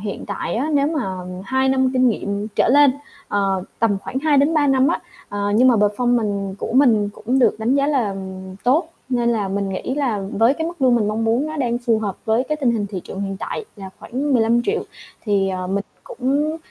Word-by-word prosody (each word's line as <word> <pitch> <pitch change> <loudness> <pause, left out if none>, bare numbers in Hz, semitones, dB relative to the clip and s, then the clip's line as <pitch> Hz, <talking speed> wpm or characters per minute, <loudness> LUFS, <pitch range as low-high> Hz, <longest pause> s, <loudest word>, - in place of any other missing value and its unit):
hiện 205 -2 -5
tại 200 - -3
á, 265 +7 -1
nếu 280 0 +3
mà 295 -9 -1 0.4
2 265 +5 +1
năm 265 -1 +2
kinh 255 -1 +4
nghiệm 205 -1 -2
trở - - +3
lên, 285 +2 +6 0.4
ờ, 195 -2 0 0.2
tầm 220 -3 +2
khoảng 260 - -4
2-3 295 +1 +3
năm 270 0 +3
á, 340 - 0 0.3
ờ, 205 0 -2
nhưng 250 +4 +5
mà 250 - +5
performance 210 -2 0
của - - -4
mình 230 -6 +4
cũng 235 +5 -1
được 255 - +3
đánh 225 +4 +1
giá 280 0 +2
là 250 -9 0 0.5
tốt, 295 +7 +2 0.2
nên 240 -2 +1
là 210 -4 0
mình 200 0 -2
nghĩ 195 +7 -3
là 255 -8 -1
với 230 +6 +3
cái 320 +1 -3
mức 340 -3 -6
lương 255 -2 +5
mình 220 -3 +1
mong 220 +2 -1
muốn, 235 +6 +1
nó 310 0 -5
đang 240 -4 0
phù 235 -2 +1
hợp 205 -3 -3
với 225 +3 +1
cái 305 - 0
tình 275 -5 +1
hình 215 -3 -1
thị 195 -2 -5
trường 195 - -7
hiện 195 -1 -3
tại 435 - -5
là 195 -2 -9
khoảng 275 +4 -3
15.000.000. 240 - +2 0.4
Thì, 200 -3 +1
ờ, 185 -1 -3
mình 200 +2 -1 0.2
cũng, 280 +6 -1
235 Hz, 215 wpm, -20 LUFS, 205-270 Hz, 0.5 s, lên